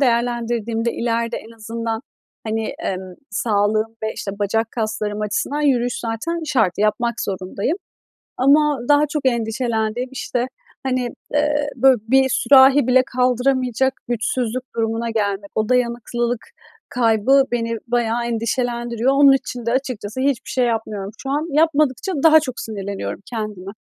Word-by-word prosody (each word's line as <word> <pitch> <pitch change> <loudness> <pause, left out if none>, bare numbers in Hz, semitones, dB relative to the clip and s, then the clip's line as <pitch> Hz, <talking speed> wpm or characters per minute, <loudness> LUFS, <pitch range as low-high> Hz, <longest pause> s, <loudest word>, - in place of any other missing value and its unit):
değerlendirdiğimde, 235 -2 0
ileride 235 0 -1
en 225 +1 -10
azından 225 0 -4 0.4
hani, 220 0 -2
emm, 185 -1 -4 0.2
sağlığım 215 +1 0
ve, 220 - -1
işte, 200 - -4
bacak 225 +2 0
kaslarım 215 -2 -2
açısından 210 +8 -1
yürüyüş 245 -4 +1
zaten 240 +10 -3
şart, 235 -11 +2
yapmak 215 +3 +1
zorundayım. 195 - -2 0.6
Ama 290 +2 +4
daha 290 +1 +5
çok 295 -1 -3
endişelendiğim, 235 0 0
işte, 245 -1 -2 0.4
hani, 255 -2 -1 0.3
eee, 295 0 +2
böyle, 265 +1 +5
bir 265 +2 +4
sürahi 265 +1 +6
bile 255 0 +5
kaldıramayacak 255 0 +2 0.2
güçsüzlük 240 +1 -1
durumuna 225 +1 -1
gelmek, 200 -2 -2
o 215 0 0
dayanıklılık 240 -1 0 0.4
kaybı 245 +3 +3
beni 230 -1 -1
bayağı 235 0 0
endişelendiriyor. 235 +1 -1
Onun 275 0 +7
için 250 -3 -2
de 235 - +1
açıkçası 255 -3 -3
hiçbir 260 -3 0
şey 255 - +1
yapmıyorum 215 -4 -2
şu 270 - -4
an. 295 +3 0
Yapmadıkça 305 +2 +2
daha 315 -1 +7
çok 255 -5 -5
sinirleniyorum 200 -2 -5
kendime. 210 -4 -5
235 Hz, 130 wpm, -20 LUFS, 220-260 Hz, 0.6 s, Onun